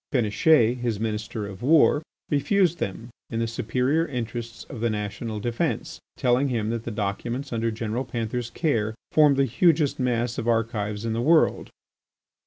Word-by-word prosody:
Péniche, 120 +1 +3
his 120 -4 -2
Minister 110 -1 -3
of 100 0 -9
War, 145 +2 +5 0.3
refused 175 +4 +2
them 115 +5 -4 0.2
in 115 - -3
the 115 - +1
superior 125 +7 0
interests 120 -2 -5
of 125 - -9
the 120 - +2
national 105 +1 -4
defence, 115 +2 -2 0.2
telling 125 +2 +2
him 115 -4 -1
that 115 -1 -4
the - - -3
documents 115 +6 -3
under 115 0 0
General 115 +2 -3
Panther's 120 -1 -3
care 115 -9 0 0.2
formed 150 -3 +5
the 135 - +4
hugest 150 +3 +2
mass 120 -2 0
of 115 - -4
archives 115 -2 -1
in 115 - -1
the 115 - -1
world. 155 +5 +3
120 Hz, 160 wpm, -25 LUFS, 110-135 Hz, 0.3 s, War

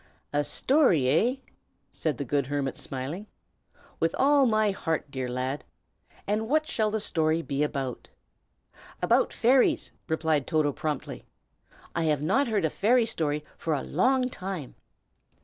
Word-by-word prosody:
"A 145 0 +2
story, 255 - +3
hey?" 230 - +2 0.5
said 150 -6 -2
the 140 - -3
good 140 +1 0
hermit, 140 -1 -2
smiling. 140 +10 -5 0.7
"With 165 0 +1
all 280 -1 +4
my 215 -2 +2
heart, 160 -6 -3
dear 130 -2 -3
lad! 130 +3 -3 0.6
And 215 +2 -1
what 310 +2 +2
shall 215 -2 0
the 220 +1 -1
story 160 -4 +1
be 140 -1 -2
about?" 135 -4 -2 0.9
"About - - +3
fairies!" 255 +2 +3 0.2
replied 160 -4 0
Toto, 155 -3 +2
promptly. 150 -2 -4 0.7
"I 165 - 0
have 150 -2 +1
not 275 - +2
heard 210 -6 +1
a - - +2
fairy 235 +3 +3
story 150 -7 -1
for 160 -2 -1
a 135 - -3
long 255 - +2
time." 185 - -6
160 Hz, 145 wpm, -27 LUFS, 145-220 Hz, 0.9 s, all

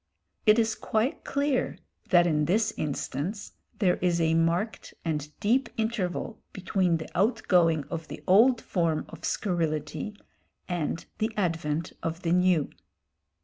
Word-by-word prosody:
It 215 +1 +7
is 225 -1 +2
quite 220 +4 -1
clear 280 -2 0 0.3
that 175 -2 +6
in 150 -3 +2
this 215 +5 +2
instance 155 - -3 0.3
there 185 -4 +2
is 175 -1 +1
a 160 -1 +2
marked 170 +6 0
and 150 -2 -2
deep 235 +6 +2
interval 220 -2 -2
between 185 -2 +1
the 160 - -7
outgoing 180 - +3
of 165 +2 -6
the - - -9
old 225 +6 +5
form 165 -4 0
of - - -11
scurrility 165 +1 -2 0.5
and 170 -2 -2
the 220 +1 0
advent 165 -4 -1
of 165 +2 -4
the 165 - 0
new. 180 -4 +3
180 Hz, 135 wpm, -28 LUFS, 165-215 Hz, 0.5 s, It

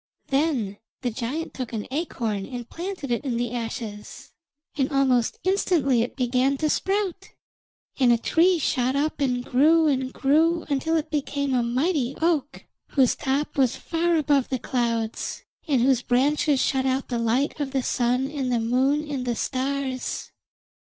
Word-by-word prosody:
Then 270 -9 0 0.2
the 245 - 0
giant 260 +8 -4
took 255 -3 -6
an 215 -2 -3
acorn 235 - -2
and 245 -2 -6
planted 345 -5 -5
it 235 - 0
in 250 -5 -1
the 240 -1 -1
ashes, 225 -3 -6 0.4
and 275 -2 0
almost 260 -4 +2
instantly 335 - +2
it 240 - -3
began 255 +2 +1
to 305 +1 +1
sprout, 390 -2 -1 0.7
and 250 -3 +5
a 235 - +5
tree 345 +9 +3
shot 260 -3 0
up 295 +1 -1
and 250 -2 0
grew 315 +6 +4
and 265 -2 0
grew 320 +6 +2
until 320 +4 +1
it 310 0 -3
became 280 -2 -1
a 250 - +3
mighty 260 +2 0
oak, 315 -4 0 0.2
whose 265 -4 +3
top 275 +2 -2
was 255 -3 +3
far 335 +1 0
above 290 -4 +2
the 260 - 0
clouds, 230 -3 -2 0.2
and 275 -5 +2
whose 260 -2 +3
branches 275 +3 +2
shut 265 0 +1
out 260 +1 -1
the 240 -2 -1
light 245 +7 0
of 285 -2 -1
the 265 -1 -1
Sun 250 +2 +1
and 270 -4 -2
the 240 - +2
Moon 265 +6 +1
and 280 -3 -3
the 240 - 0
stars. 265 +1 -3
270 Hz, 165 wpm, -25 LUFS, 245-300 Hz, 0.7 s, and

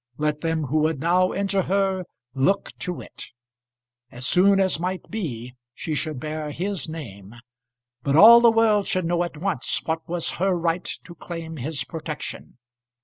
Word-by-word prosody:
Let 150 0 -1
them 165 -1 -1
who 150 +3 0
would 155 -1 +1
now 180 +4 +2
injure 195 0 0
her 190 0 0 0.3
look 140 +10 +1
to 180 -2 -4
it. - - -10 0.8
As 125 +1 -7
soon 195 +5 +4
as 190 -4 +2
might 180 +2 -4
be 125 - -5 0.2
she 160 - -4
should 150 -2 -3
bear 155 +1 -4
his 180 +1 -4
name; 110 -10 -9 0.7
but 140 +2 0
all 230 +7 +10
the 235 - +7
world 220 -3 +3
should 185 -2 0
know 175 +1 +1
at 175 -3 -6
once 165 -6 -1
what 160 0 -3
was 175 -1 -1
her 190 -1 +3
right 170 +1 -1
to 170 - -11
claim 165 -2 -7
his 145 +3 -3
protection. 160 -6 -7
165 Hz, 165 wpm, -24 LUFS, 150-190 Hz, 0.8 s, all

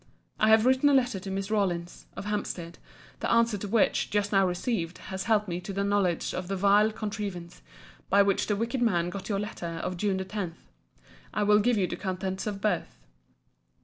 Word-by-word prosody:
I 215 - +4
have 220 +1 +6
written 260 +3 +4
a 280 - +4
letter 245 -6 +2
to 195 - -7
Miss 195 +1 -3
Rawlins, 175 -5 -1
of - - -6
Hampstead; 180 -5 -4 0.4
the - - -2
answer 230 -1 +3
to 205 - -5
which, 220 +1 +2
just 205 -1 0
now 195 -2 +4
received, 180 -1 -2
has 190 0 -6
helped 215 -2 +2
me 175 0 -3
to 200 - -6
the 200 +1 -1
knowledge 200 -4 +1
of 180 -1 -4
the 195 - -2
vile 205 +3 +4
contrivance, 200 -5 -5 0.5
by 200 +1 +6
which 200 -1 +1
the 205 - +1
wicked 235 +4 -2
man 175 -7 +1
got 195 +3 -7
your 200 - 0
letter 170 -5 -5
of 180 -1 -3
June 195 0 0
the 190 - -3
10th. 190 -4 -4 0.8
I 210 - +1
will 210 0 +5
give 235 +2 +2
you 195 - +2
the - - -4
contents 190 +1 -3
of 200 -2 -4
both. 210 - -1
200 Hz, 205 wpm, -28 LUFS, 185-215 Hz, 0.8 s, have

